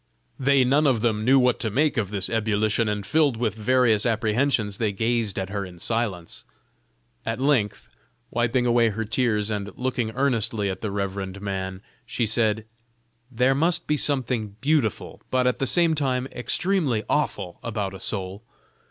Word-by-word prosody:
They 135 0 +4
none 145 +4 +3
of 125 -5 +2
them 110 -2 +1
knew 130 +4 +5
what 125 -2 +3
to 110 - -1
make 145 +7 +1
of 105 -5 -1
this 100 -2 -3
ebullition, 110 0 +1
and 105 -1 -2
filled 150 -6 +2
with 115 -3 0
various 110 0 +2
apprehensions 110 -1 +1
they 110 -3 +1
gazed 110 0 0
at 95 0 -3
her 100 -1 -2
in 90 -2 -10
silence. 100 -4 -2 0.8
At 115 +2 -3
length, 130 -7 +1 0.4
wiping 120 +1 +1
away 120 -1 +4
her 110 +2 -3
tears, 110 -2 0
and 105 -1 -3
looking 125 -3 -1
earnestly 115 -6 0
at 95 - -7
the 110 - -2
reverend 100 -1 -3
man, 95 -1 -4 0.2
she 120 - -1
said: 110 0 +1 0.6
"There 125 +2 +2
must 165 +5 +1
be 150 - +1
something 125 -8 -1
beautiful, 140 -6 0
but 130 -1 +1
at 125 - +1
the 135 - 0
same 170 +1 +3
time 130 -4 0
extremely 145 - +1
awful, 90 - -1
about 105 -4 -3
a 95 - -8
soul. 95 0 -4
115 Hz, 165 wpm, -24 LUFS, 105-130 Hz, 0.8 s, knew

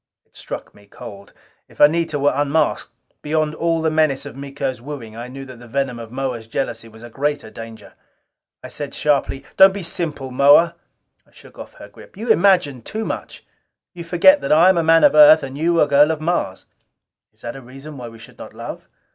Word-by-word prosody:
It - - -38
struck - - -8
me 100 0 -21
cold. 100 0 -12 0.4
If - - -22
Anita 155 +1 +3
were 145 0 +2
unmasked, 145 +2 -1 0.3
beyond 155 0 -1
all 165 0 -1
the 160 - +1
menace 155 -4 +1
of - - -9
Miko's 135 -2 -5
wooing, 125 -5 -9
I 120 +2 -7
knew 135 +2 -9
that 130 -2 -12
the 120 - -13
venom 130 -1 -3
of 115 -1 -10
Moa's 125 -3 -4
jealousy 115 -2 -4
was 110 0 -16
a 120 - -10
greater 145 -4 -3
danger. 115 0 -11 0.7
I - - -9
said 145 -2 -7
sharply, 140 -2 -1
"Don't 190 0 +7
be 200 - -5
simple, 150 -6 -5
Moa!" 145 +6 +5 0.5
I - - -28
shook - - -17
off - - -11
her - - -12
grip. - - -17
"You 230 +3 -6
imagine 175 - +2
too 220 - -5
much. - - -7 0.5
You 175 -2 -8
forget 180 - +4
that - - -3
I 165 +4 +6
am 190 - +3
a - - 0
man 165 +1 +4
of 290 - +6
Earth 300 +1 +7
and 135 0 -7
you 165 +3 +1
a 150 - +4
girl 145 +1 +4
of 160 -1 -2
Mars." 155 - -2 0.7
"Is 110 - -26
that 125 +3 -8
reason 135 +5 -11
why 125 -3 -8
we 115 - -14
should 110 - -16
not - - -11
love?" - - -8
145 Hz, 205 wpm, -19 LUFS, 125-165 Hz, 0.7 s, Don't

